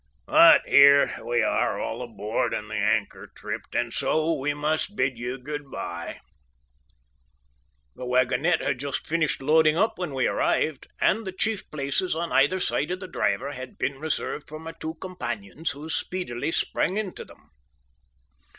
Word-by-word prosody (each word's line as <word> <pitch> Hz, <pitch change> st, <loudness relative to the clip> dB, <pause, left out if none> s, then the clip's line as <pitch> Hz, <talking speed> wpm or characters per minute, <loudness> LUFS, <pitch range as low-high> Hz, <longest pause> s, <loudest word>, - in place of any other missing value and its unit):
But -, -, +7 dB
here 140 Hz, 0 st, +6 dB
we 120 Hz, -1 st, +1 dB
are -, -, +1 dB
all -, -, -3 dB
aboard 110 Hz, -3 st, -2 dB
and -, -, -6 dB
the -, -, -3 dB
anchor -, -, 0 dB
tripped, -, -, -6 dB, 0.2 s
so 160 Hz, +1 st, +1 dB
we 145 Hz, 0 st, -1 dB
must 155 Hz, +6 st, -1 dB
bid 130 Hz, -10 st, +1 dB
you 120 Hz, +3 st, -4 dB
good 145 Hz, +2 st, -6 dB
bye." 85 Hz, -7 st, -6 dB, 1.7 s
The 125 Hz, -, -7 dB
wagonette 130 Hz, +7 st, +2 dB
had 130 Hz, -, -1 dB
just 140 Hz, 0 st, -3 dB
finished 155 Hz, -4 st, 0 dB
loading 155 Hz, +2 st, +4 dB
up 220 Hz, 0 st, +1 dB
when 165 Hz, -7 st, -3 dB
we 130 Hz, -, +1 dB
arrived, 155 Hz, -4 st, 0 dB
and 225 Hz, -, +2 dB
the 190 Hz, -, -4 dB
chief 215 Hz, +3 st, -2 dB
places, 150 Hz, +5 st, -1 dB
on 170 Hz, +1 st, -3 dB
either 145 Hz, +7 st, +3 dB
side 150 Hz, -, -1 dB
of 180 Hz, +1 st, -2 dB
the 185 Hz, -, -7 dB
driver, 140 Hz, -4 st, -1 dB
had 130 Hz, -2 st, -8 dB
been 135 Hz, -1 st, -2 dB
reserved 155 Hz, -1 st, -3 dB
for 155 Hz, -, -7 dB
my 160 Hz, +1 st, -7 dB
two 165 Hz, 0 st, -6 dB
companions, 160 Hz, -, -5 dB
who 145 Hz, +2 st, -7 dB
speedily 160 Hz, -6 st, -3 dB
sprang 185 Hz, +3 st, 0 dB
into 210 Hz, -4 st, -4 dB
them. -, -, -19 dB
150 Hz, 160 wpm, -26 LUFS, 130-165 Hz, 1.7 s, But